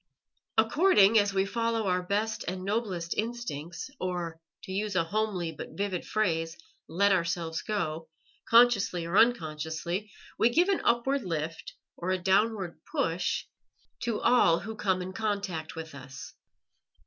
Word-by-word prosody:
According 225 Hz, -, +5 dB
as 205 Hz, -1 st, +2 dB
we 195 Hz, 0 st, +1 dB
follow 230 Hz, +1 st, -1 dB
our 180 Hz, 0 st, +2 dB
best 210 Hz, +4 st, -1 dB
and 185 Hz, +1 st, -4 dB
noblest 195 Hz, -5 st, -1 dB
instincts, 200 Hz, -, -4 dB
or, 175 Hz, -3 st, -3 dB, 0.2 s
to -, -, -8 dB
use 205 Hz, +1 st, -2 dB
a 180 Hz, -, +3 dB
homely 185 Hz, -2 st, -1 dB
but 155 Hz, -, -9 dB
vivid 195 Hz, -3 st, -2 dB
phrase, 165 Hz, -6 st, 0 dB, 0.3 s
let 200 Hz, +5 st, +3 dB
ourselves 170 Hz, -3 st, 0 dB
go, 160 Hz, -6 st, -3 dB, 0.4 s
consciously 225 Hz, -7 st, +5 dB
or 170 Hz, +3 st, -3 dB
unconsciously, 170 Hz, -2 st, +1 dB, 0.3 s
we 230 Hz, -, +5 dB
give 345 Hz, +10 st, +3 dB
an 390 Hz, -, +2 dB
upward 265 Hz, +4 st, +2 dB
lift 165 Hz, -2 st, -4 dB, 0.2 s
or 180 Hz, -, -4 dB
a 185 Hz, -, +2 dB
downward 190 Hz, -1 st, +1 dB
push 165 Hz, +2 st, 0 dB, 0.5 s
to 230 Hz, -3 st, -1 dB
all 170 Hz, -9 st, +4 dB
who 220 Hz, +1 st, -6 dB
come 190 Hz, -3 st, 0 dB
in 185 Hz, +1 st, -7 dB
contact 200 Hz, -7 st, -3 dB
with 160 Hz, -1 st, -7 dB
us. 130 Hz, -1 st, -10 dB
190 Hz, 140 wpm, -29 LUFS, 165-220 Hz, 0.5 s, According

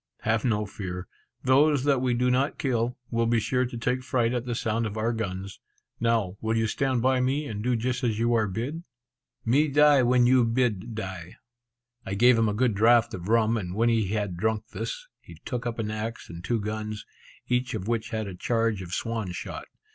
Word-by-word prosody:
"Have 110 Hz, 0 st, +1 dB
no 105 Hz, -4 st, +1 dB
fear; 90 Hz, -3 st, -6 dB, 0.4 s
those 140 Hz, +1 st, +4 dB
that 140 Hz, -3 st, +2 dB
we 125 Hz, -2 st, +1 dB
do 125 Hz, +1 st, +2 dB
not 135 Hz, +3 st, +1 dB
kill, 120 Hz, -2 st, -1 dB
will 115 Hz, -1 st, +1 dB
be 115 Hz, 0 st, +3 dB
sure 125 Hz, +3 st, 0 dB
to 120 Hz, -, -7 dB
take 125 Hz, +2 st, -1 dB
fright 125 Hz, -3 st, 0 dB
at 120 Hz, -1 st, -2 dB
the 120 Hz, -, -1 dB
sound 115 Hz, 0 st, -1 dB
of 105 Hz, +1 st, -6 dB
our 115 Hz, +2 st, 0 dB
guns. 100 Hz, -3 st, -5 dB, 0.4 s
Now 110 Hz, -5 st, +1 dB
will 110 Hz, 0 st, 0 dB
you 110 Hz, -, +2 dB
stand 130 Hz, +2 st, 0 dB
by 130 Hz, 0 st, +3 dB
me, 135 Hz, +4 st, 0 dB
and 105 Hz, -6 st, -5 dB
do 125 Hz, 0 st, +1 dB
just 125 Hz, +3 st, -2 dB
as 115 Hz, -3 st, +1 dB
you 115 Hz, +1 st, +1 dB
are 110 Hz, -2 st, +2 dB
bid?" 120 Hz, -, -4 dB, 0.6 s
"Me 140 Hz, +7 st, +3 dB
die 145 Hz, -1 st, +5 dB
when 125 Hz, 0 st, +4 dB
you 125 Hz, 0 st, +5 dB
bid 115 Hz, -3 st, 0 dB
die." 95 Hz, -5 st, -6 dB, 0.7 s
I 95 Hz, -, -4 dB
gave 120 Hz, +4 st, +6 dB
him 115 Hz, -1 st, +2 dB
a -, -, -1 dB
good 120 Hz, 0 st, +2 dB
draught 115 Hz, +2 st, +4 dB
of 90 Hz, 0 st, -6 dB
rum; 115 Hz, 0 st, +3 dB
and 90 Hz, -3 st, -4 dB
when 115 Hz, +2 st, +3 dB
he 115 Hz, -3 st, +2 dB
had 100 Hz, -3 st, -2 dB
drunk 110 Hz, +3 st, -1 dB
this, -, -, -5 dB
he -, -, -14 dB
took 125 Hz, -1 st, -3 dB
up 120 Hz, -, -3 dB
an 110 Hz, -2 st, -2 dB
axe 110 Hz, 0 st, -5 dB
and 85 Hz, 0 st, -9 dB
two 115 Hz, +4 st, 0 dB
guns, 105 Hz, 0 st, -4 dB, 0.4 s
each 125 Hz, +1 st, 0 dB
of 95 Hz, -, -5 dB
which 115 Hz, 0 st, -1 dB
had 110 Hz, -2 st, -2 dB
a 100 Hz, -, -6 dB
charge 115 Hz, +2 st, 0 dB
of 90 Hz, -1 st, -8 dB
swan 115 Hz, -5 st, -3 dB
shot. -, -, -6 dB
115 Hz, 215 wpm, -26 LUFS, 105-125 Hz, 0.7 s, gave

